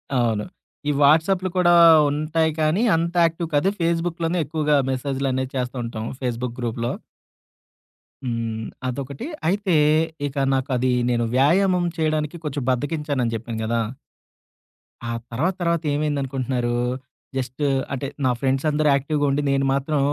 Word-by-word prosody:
అవును. 115 -4 +1 0.4
ఈ - - +4
వాట్సాప్లు 165 +6 +4
కూడా 175 -1 +5 0.4
ఉంటాయి 155 +2 0
కానీ 155 +6 +2
అంత 170 +2 -1
యాక్టివ్ 165 +1 -1
కాదు 145 +6 +3
ఫేస్‌బుక్‌లోనే 170 0 0
ఎక్కువగా 150 0 +1 0.2
మెసేజ్‌లనేవి 130 0 -2
చేస్తా 125 0 -2
ఉంటాం. 115 -1 -5 0.2
ఫేస్‌బుక్ 120 -1 -3
గ్రూప్‌లో. 120 0 -2 1.3
హ్మ్. 115 -2 -3 0.2
అదొకటి. 135 - -5 0.2
అయితే 190 -1 +1 0.5
ఇక 140 - -9 0.2
నాకు 135 +1 -1
అది 130 +1 +1 0.2
నేను 120 -1 +1
వ్యాయామం 180 +6 +3
చేయడానికి 155 0 -1
కొంచెం 145 -2 -3
బద్దకించానని 145 -2 -1
చెప్పాను 115 0 -5
గదా 115 +1 0 1.3
ఆ - - -2 0.2
తర్వాత 155 +11 0
తర్వాత 170 -1 +1
ఏమైందనుకుంటున్నారు? 135 -4 -1 0.6
జస్ట్ 130 +2 -4 0.3
అంటే 140 +1 -3 0.2
నా - - +4
ఫ్రెండ్స్ 135 +2 0
అందరూ 150 0 +1
యాక్టివ్‌గా 145 +2 0
ఉండి 140 +2 +1
నేను 135 0 +1
మాత్రం 140 +2 0
140 Hz, 125 wpm, -23 LUFS, 125-160 Hz, 1.3 s, కూడా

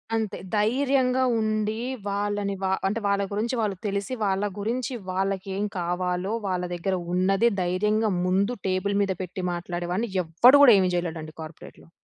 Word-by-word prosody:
అంతే. 220 -2 -2 0.2
ధైర్యంగా 260 +3 +2 0.2
ఉండి. 215 0 0 0.3
వాళ్ళని 205 0 -1
వా 190 - +1 0.2
అంటే 210 +4 -1
వాళ్ళ 200 0 +2
గురించి 225 +5 -1
వాళ్ళు 205 -3 -1
తెలిసి 200 +4 -2
వాళ్ళ 195 0 0 0.2
గురించి 245 +5 -2 0.2
వాళ్ళకి 195 +1 -1
ఏం 205 - 0
కావాలో, 180 +3 -1
వాళ్ళ 180 -1 -1
దగ్గర 185 +2 -1 0.2
ఉన్నది 195 +5 +3
ధైర్యంగా 210 +4 +1
ముందు 195 +6 +1
టేబుల్ 190 +2 0
మీద 195 - -1
పెట్టి 185 +1 -6
మాట్లాడేవాడిని. 175 +5 -3 0.2
ఎవ్వడు 240 - +6
గూడా 245 -5 +9
ఏమి 185 -1 +2
జేయలేడండి 160 -3 -4
కార్పొరేట్‌లో. 160 +1 -11
200 Hz, 145 wpm, -25 LUFS, 185-215 Hz, 0.3 s, గూడా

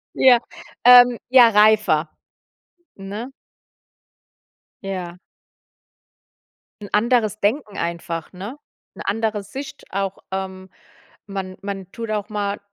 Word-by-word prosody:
Ja, 250 -2 +6 0.5
ähm, 245 -1 +8
ja 250 -2 +7
reifer, 210 -7 +4 0.9
ne? 205 +6 -7 1.5
Ja. 180 -3 -5 1.6
'N 205 - -8
anderes 215 -1 +2
Denken 215 +1 -1
einfach, 170 -1 -4
ne? 200 +9 -8 0.4
'Ne - - -8
andere 215 -1 -1
Sicht 270 +6 -9
auch. 195 0 -2
Ähm, 190 0 -5 0.6
man 190 -2 -6
man 195 -2 -6
tut 230 -2 -6
auch 210 0 -3
mal 205 -1 -3
205 Hz, 100 wpm, -21 LUFS, 190-230 Hz, 1.6 s, ähm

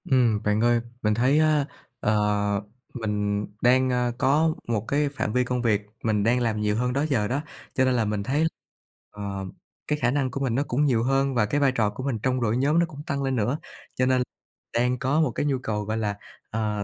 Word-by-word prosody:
Ừm, 120 -6 +3
bạn 105 0 +1
ơi, 120 0 +3 0.2
mình 105 0 +2
thấy 130 +7 +3
á, 155 -2 +3 0.3
ờ, 105 - +1 0.8
mình 105 -3 -1 0.2
đang, 130 +1 +4
ơ, 125 -1 +1
có 155 +5 +3
một 115 -2 -1
cái 145 +1 +1
phạm 135 -6 -3
vi 125 - +3
công 125 0 -1
việc 110 -4 +2 0.2
mình 105 -2 +1
đang 120 +3 +3
làm 110 -3 0
nhiều 105 0 +1
hơn 125 +2 0
đó 140 +3 +1
giờ 110 -7 +1
đó, 135 +5 -1 0.3
cho 130 - +3
nên 130 - +2
là 120 -3 +1
mình 105 -1 -1
thấy, 145 +7 +1 0.6
ờm, 100 -2 -5 0.4
cái 150 0 0
khả 120 - +2
năng 135 -2 0
của - - -4
mình 130 -4 0
nó 140 - +2
cũng 140 +4 +1
nhiều 120 -5 +2
hơn 135 +1 +1
và 110 -3 +3
cái 145 +7 0
vai 140 -2 +4
trò 110 -5 +1
của 105 +5 -7
mình 130 -5 -1
trong 130 -1 +1
đội 115 0 +1
nhóm 145 +5 +3
nó 170 - +4
cũng 150 -3 -10
tăng 140 -1 -1
lên 135 -1 0
nữa, 120 +5 0 0.4
cho 130 - +2
nên 130 0 +3 0.5
đang 125 +2 +2
có 140 +5 +2
một 150 -6 +2
cái 130 - -2
nhu 140 -2 +1
cầu, 105 -4 -2
gọi 110 +2 -2
là, 105 -2 -2 0.3
ờ, 105 -2 -1
125 Hz, 230 wpm, -25 LUFS, 110-135 Hz, 0.8 s, đang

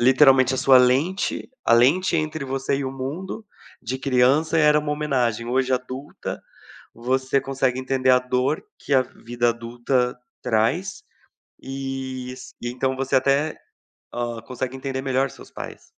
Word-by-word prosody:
literalmente 130 0 +5
a - - -2
sua 130 0 +6
lente, 135 - +1
a - - +3
lente 160 +10 +4
entre 155 -2 -2
você 135 +1 -1
e 140 - -3
o 130 - -2
mundo, 165 +11 -5 0.4
de 130 +3 -3
criança 135 +5 +3
era 150 -1 +5
uma 150 0 -2
homenagem, 125 -6 0
hoje 130 +1 +1
adulta, 130 +3 -4 0.5
você 130 +3 0
consegue 135 -2 -1
entender 130 0 0
a 125 - +7
dor 125 +4 0 0.2
que - - -10
a 130 - +6
vida 120 -1 -2
adulta 120 +2 -1 0.2
traz, 130 - 0 0.6
e 135 -1 -5
s 130 - -11
então 130 +2 -1
você 135 0 -1
até, 140 +4 +2 0.6
hã, 120 -1 -3
consegue 125 +2 -5
entender 130 0 -4
melhor 135 0 +1
seus - - -14
pais. - - -9
130 Hz, 145 wpm, -23 LUFS, 125-140 Hz, 0.6 s, a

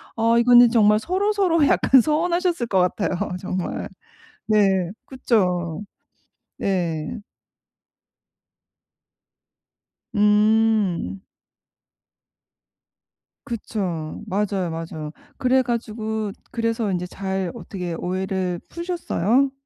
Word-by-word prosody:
어 230 +1 +3
이거는 240 0 +7
정말 215 -2 +4
서로 385 - 0
서로 340 -7 +3
약간 265 - +5
서운하셨을 340 -2 0
것 190 -3 +2 0.2
같아요 185 -4 -1 0.2
정말. 185 -1 -4 0.6
네 195 -4 +2
그쵸? 180 - 0 0.8
네. 170 -5 -2 3.0
음. 210 - +2 2.2
그쵸. 185 -9 -4
맞아요, 195 -3 -1
맞아요. 160 -2 -6 0.3
그래 260 0 +3
가지고 220 -3 -3 0.2
그래서 230 -2 -1
인제 180 0 -2
잘 190 -1 -3
어떻게 180 -4 -6
오해를 185 0 -2
푸셨어요? 275 - 0
210 Hz, 175 characters per minute, -22 LUFS, 180-240 Hz, 3.0 s, 이거는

